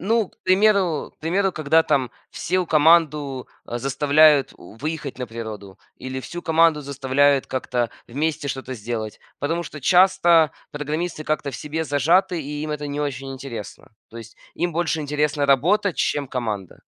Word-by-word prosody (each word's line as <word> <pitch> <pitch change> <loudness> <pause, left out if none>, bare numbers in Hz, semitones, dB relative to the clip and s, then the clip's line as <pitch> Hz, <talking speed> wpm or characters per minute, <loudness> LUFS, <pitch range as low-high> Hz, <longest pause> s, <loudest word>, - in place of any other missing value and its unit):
Ну, 220 +1 +1
к - - -28
примеру 185 -4 +2
к - - -51
примеру, 185 +4 0
когда 160 +1 +3
там 135 -5 +1 0.2
всю 185 -1 -1
команду, 150 -4 +3 0.2
э, 120 - -4
заставляют 145 +2 +4
у 90 - -14
выехать 150 0 -5
на 125 - -4
природу 110 -4 -8 0.2
или 130 0 -6
всю 175 +6 -7
команду 165 -2 +3
заставляют 140 0 +1
как-то 125 -2 -2 0.2
вместе 145 +2 -2
что-то 130 0 -5
сделать, 110 -1 -5 0.2
потому 165 +4 -1
что 150 - -9
часто 175 -1 +5 0.2
программисты 155 +2 -3
как-то 155 -2 -1
в - - -5
себе 160 +2 -4
зажаты 165 +5 +2
и 145 +1 -5
им 155 - -4
это 150 -1 -4
не 145 +1 -3
очень 135 -2 -4
интересно. 120 -6 -9 0.2
То 115 - -12
есть 115 -1 -12 0.2
им 175 -1 -1
больше 165 -1 -1
интересна 150 0 0
работа, 180 +9 +3
чем 145 -1 -1
команда. 110 -8 -4
145 Hz, 160 wpm, -22 LUFS, 130-165 Hz, 0.2 s, часто